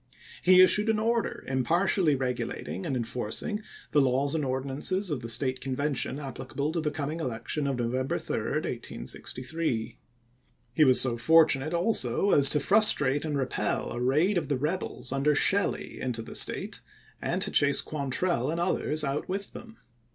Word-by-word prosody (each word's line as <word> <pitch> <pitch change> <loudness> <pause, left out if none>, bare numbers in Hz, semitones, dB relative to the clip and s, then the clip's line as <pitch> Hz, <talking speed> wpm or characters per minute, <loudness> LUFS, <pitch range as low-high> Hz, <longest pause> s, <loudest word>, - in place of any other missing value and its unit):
He 185 0 +7
issued 210 +4 +4
an 220 - +2
order 230 +1 -1
impartially 160 +5 +1
regulating 125 -7 -4
and 135 - -2
enforcing 120 - -3 0.3
the 145 - +4
laws 135 +2 +1
and 160 -2 -1
ordinances 140 +8 -2
of 145 - -2
the 115 -1 -6
State 130 +2 +2
Convention 135 +1 -2
applicable 140 +1 -5
to 165 0 -2
the 155 - -1
coming 150 +2 -4
election 130 +2 -3
of 135 -2 -2
November 125 +2 -2
3, - - -5 0.3
1863. 125 - -4 0.7
He 155 - +4
was 130 -3 +7
so 120 -3 +5
fortunate 155 +2 +3
also 175 - +1
as 140 -1 +6
to 150 - +3
frustrate 145 -6 +3
and 150 -2 -2
repel 135 -2 -2
a 120 - -5
raid 155 +10 +2
of - - -7
the 140 - -1
rebels 150 -2 -3
under 140 +2 +1
Shelley 200 +6 0
into 120 -3 -3
the - - -10
State, - - 0 0.4
and - - -2
to - - -3
chase 145 0 +3
Quantrell 140 0 -1
and 165 +2 -2
others 155 -3 0
out 140 +1 -3
with 195 +1 -4
them. 230 -1 -12
145 Hz, 160 wpm, -27 LUFS, 130-170 Hz, 0.7 s, He